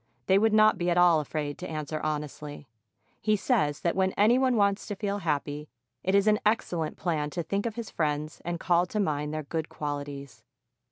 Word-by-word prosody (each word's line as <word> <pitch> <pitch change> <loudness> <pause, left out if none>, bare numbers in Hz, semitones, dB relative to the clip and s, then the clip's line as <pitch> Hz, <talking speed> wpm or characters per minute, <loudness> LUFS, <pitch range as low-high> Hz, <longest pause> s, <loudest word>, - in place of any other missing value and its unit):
they 190 +1 +4
would 220 +1 +3
not 215 0 +5
be 175 0 0
at 175 - +1
all 175 -2 +6
afraid 150 -1 -4
to 180 - -6
answer 155 0 -4
honestly. 150 -1 -5 0.5
He 215 -1 +2
says 195 - 0
that 170 - 0
when 190 0 +1
any 225 +5 +4
one 260 -2 +2
wants 200 -1 +1
to 205 - -3
feel 200 0 -2
happy, 150 -3 -2 0.3
it 190 +6 +1
is 200 0 +4
an 215 0 +4
excellent 175 -7 0
plan 155 -5 -1
to 170 +3 -3
think 200 +6 -1
of 225 - -5
his 235 -3 -6
friends 150 -1 -2
and 175 0 -3
call 175 0 +2
to 210 - -3
mind 150 -6 -1
their 155 0 -3
good 160 +2 -4
qualities. 145 -5 -6
170 Hz, 205 wpm, -28 LUFS, 150-200 Hz, 0.5 s, all